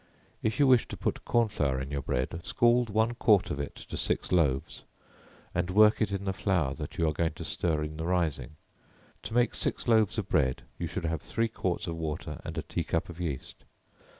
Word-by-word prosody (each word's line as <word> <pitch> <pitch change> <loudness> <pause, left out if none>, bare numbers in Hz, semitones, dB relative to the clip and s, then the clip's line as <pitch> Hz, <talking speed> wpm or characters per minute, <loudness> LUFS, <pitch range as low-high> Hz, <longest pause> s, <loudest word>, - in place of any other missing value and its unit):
If 110 +4 -1
you 145 - +6
wish 130 -3 +5
to - - -7
put - - -2
corn 120 -1 +3
flour 70 -10 0
in 65 +1 -5
your 70 -1 -2
bread, 65 +6 -2
scald 120 0 +3
one 110 +3 +2
quart 105 -4 +3
of 70 - -3
it 70 - -4
to - - -8
six - - -1
loaves, 70 -7 +1 0.7
and 90 0 0
work 105 +4 +5
it 110 - +1
in 100 0 -3
the 95 - 0
flour 85 -10 0
that - - -7
you 85 - +2
are 80 - +1
going 80 0 0
to - - -8
stir 80 -3 0
in 75 0 -5
the 80 +1 -3
rising, 80 -7 -1 0.7
to 110 - -6
make 120 0 +3
six - - -2
loaves 110 -2 +3
of 105 -4 -2
bread, 65 -7 +1 0.2
you 85 - -2
should 85 +1 -4
have 80 -2 -1
three 115 0 -1
quarts 95 -5 -2
of 85 -2 -4
water 80 -2 -4
and - - -6
a - - -1
tea - - -3
cup 80 - -1
of 85 0 -8
yeast. 75 -7 -5
85 Hz, 220 wpm, -29 LUFS, 75-110 Hz, 0.7 s, you